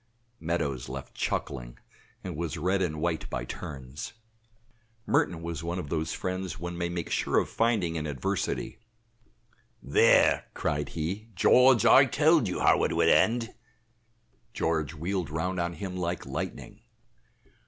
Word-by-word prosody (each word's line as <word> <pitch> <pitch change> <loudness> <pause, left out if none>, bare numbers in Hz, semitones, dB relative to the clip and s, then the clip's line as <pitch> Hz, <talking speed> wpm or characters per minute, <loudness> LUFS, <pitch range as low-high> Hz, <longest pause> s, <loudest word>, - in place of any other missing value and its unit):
Meadows 70 -7 -2
left - - -7
chuckling - - -3 0.5
and 90 -3 -5
was 85 +1 -3
red 95 +5 +1
and 80 -4 -1
white 85 0 -2
by - - -3
turns. 65 - -7 0.9
Merton 85 -2 +1
was 85 -1 -4
one 85 +2 -3
of 75 -6 -5
those 80 0 -1
friends 95 -3 -3
one 85 0 -5
may 85 0 -2
make 85 -1 -4
sure - - +1
of - - +2
finding 110 -8 +1
in 75 -1 -3
adversity. 70 - -3 1.0
"There," - - +4
cried 75 0 -1
he, 95 +8 -3
"George, 125 +5 +5
I 135 +3 +8
told 155 -2 +3
you 90 - -3
how - - +4
it - - +1
would - - +4
end." 115 0 +3 1.0
George 80 -1 -1
wheeled 90 +1 -2
round 90 +4 -2
on 85 0 -1
him 90 +3 -6
like 90 -1 -3
lightning. - - -6
85 Hz, 145 wpm, -28 LUFS, 80-95 Hz, 1.0 s, I